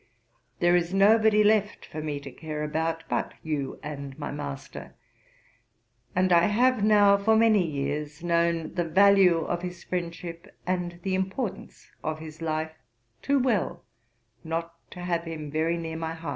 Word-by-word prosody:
There 175 0 +4
is 175 +1 0
nobody 215 +1 +5
left 210 -1 +2
for 155 - -7
me 150 -2 -3
to 140 -1 -9
care 155 +2 -5
about 160 +2 -2
but - - -2
you 145 -4 -3
and 140 -2 -7
my 145 - -5
master, 140 -2 -7 1.2
and 185 0 +3
I 170 0 +5
have 240 +1 +2
now 205 -1 +6
for 220 +2 +3
many 220 -3 +5
years 150 0 -3
known 170 -1 +1
the 175 - 0
value 190 0 +5
of 175 +2 -2
his 180 -1 -7
friendship, 170 +1 -6
and 175 -1 -2
the 190 - -1
importance 190 +4 -4
of 155 0 -2
his 155 0 -10
life, 160 0 -2 0.5
too 280 0 +2
well 215 -9 0 0.6
not 165 +1 -3 0.2
to 180 - -9
have 170 -1 -1
him 155 -3 -6
very 160 +2 0
near 160 -1 -5
my 165 0 -4
heart.' 165 -2 -6
170 Hz, 160 wpm, -27 LUFS, 155-195 Hz, 1.2 s, now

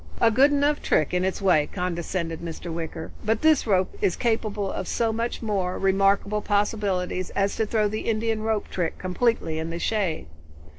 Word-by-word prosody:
"A 225 - +5
good 265 +6 +5
enough 290 +1 +2
trick, 155 - +1
in 180 0 +1
its 190 +2 -2
way," 155 -6 +3
condescended 170 -2 -3
Mr. 170 0 -6
Wicker, 165 0 -5
"but 220 +3 0
this 315 -6 +4
rope 190 -3 +1
is 180 - +2
capable 215 -4 -1
of 190 - -4
so 225 -1 0
much 235 +1 -3
more 195 -4 -1
remarkable 195 +2 +2
possibilities 200 -3 0
as 200 0 +1
to 220 - 0
throw 215 -1 +2
the 215 +2 -3
Indian 225 0 0
rope 220 -1 -1
trick 175 -3 -2
completely 185 -4 0
in 160 +1 -3
the 165 - -4
shade." 190 -3 -1
200 Hz, 180 wpm, -25 LUFS, 180-220 Hz, -, A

